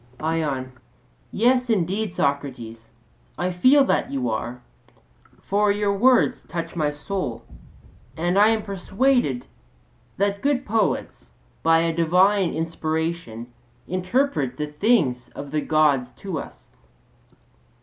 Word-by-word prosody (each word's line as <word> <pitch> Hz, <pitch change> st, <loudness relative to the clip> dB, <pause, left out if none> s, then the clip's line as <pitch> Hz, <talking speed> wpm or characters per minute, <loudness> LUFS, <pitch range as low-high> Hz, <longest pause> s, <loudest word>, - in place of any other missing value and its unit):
ION: 150 Hz, -5 st, -2 dB, 0.6 s
Yes, 250 Hz, +3 st, +2 dB
indeed, 200 Hz, 0 st, 0 dB
Socrates, 130 Hz, -7 st, -3 dB, 0.5 s
I 180 Hz, +1 st, -1 dB
feel 255 Hz, +11 st, +5 dB
that -, -, 0 dB
you 130 Hz, -4 st, -2 dB
are; 120 Hz, +3 st, -4 dB, 0.8 s
for 205 Hz, +1 st, +2 dB
your 205 Hz, 0 st, 0 dB
words 245 Hz, +5 st, +3 dB
touch 170 Hz, -1 st, -5 dB
my 155 Hz, -3 st, +1 dB
soul, 150 Hz, -, -5 dB, 0.7 s
and 175 Hz, +3 st, 0 dB
I 205 Hz, +2 st, +6 dB
am 220 Hz, -1 st, +1 dB
persuaded 195 Hz, -, 0 dB, 0.7 s
that 200 Hz, 0 st, 0 dB
good 275 Hz, -2 st, 0 dB
poets 220 Hz, +1 st, -1 dB, 0.3 s
by 165 Hz, 0 st, +4 dB
a 165 Hz, 0 st, 0 dB
divine 180 Hz, +3 st, +3 dB
inspiration 160 Hz, -7 st, -3 dB, 0.3 s
interpret 185 Hz, -, -1 dB
the 150 Hz, -, -2 dB
things 150 Hz, -, +1 dB
of 140 Hz, -1 st, -7 dB
the 155 Hz, 0 st, 0 dB
Gods 145 Hz, -6 st, +2 dB
to 185 Hz, -6 st, -5 dB
us. -, -, -11 dB
170 Hz, 115 wpm, -23 LUFS, 145-205 Hz, 0.8 s, I